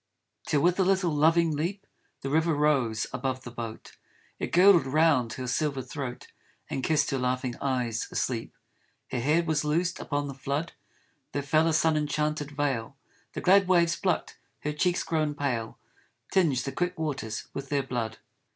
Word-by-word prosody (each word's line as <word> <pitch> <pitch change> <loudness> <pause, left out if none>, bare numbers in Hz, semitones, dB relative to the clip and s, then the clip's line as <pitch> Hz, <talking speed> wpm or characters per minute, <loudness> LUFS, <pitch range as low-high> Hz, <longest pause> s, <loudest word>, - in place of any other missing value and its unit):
Till 145 - +2
with 175 +4 +2
a - - +5
little 190 -2 +2
loving 160 +1 +3
leap 180 +7 -3 0.4
The 135 - -4
river 160 +1 +2
rose 135 -7 +2
above 130 0 -2
the 120 - -8
boat, 115 -2 -8 0.4
It - - -3
girdled 180 -5 +6
round 145 -5 +3
her 130 +2 -5
silver 135 +1 -1
throat 130 -1 -6 0.5
And 130 - -2
kissed 150 -2 +2
her 135 - 0
laughing 125 0 -1
eyes 125 -5 -1
asleep. 115 -3 -2 0.6
Her 125 - -1
hair 150 +7 +2
was 155 -2 0
loosed, 170 +4 0
upon 145 -1 -2
the 140 - -5
flood 140 +4 -3 0.6
There 145 - -1
fell 155 +3 +3
a 165 - +2
sun 160 0 +3
enchanted 150 0 -1
veil 140 -4 -2 0.4
The - - -4
glad 195 +1 +5
waves 170 -2 +4
plucked, 185 - -1 0.2
her 150 - -2
cheeks 175 +4 +1
grown 155 -3 0
pale 125 -6 -2 0.6
Tmged 150 -9 +3
the 135 - -3
quick 180 +6 -2
waters 140 -9 -3
with 140 -1 -6
their 140 -1 +1
blood. 120 -4 -3
145 Hz, 170 wpm, -28 LUFS, 130-160 Hz, 0.6 s, girdled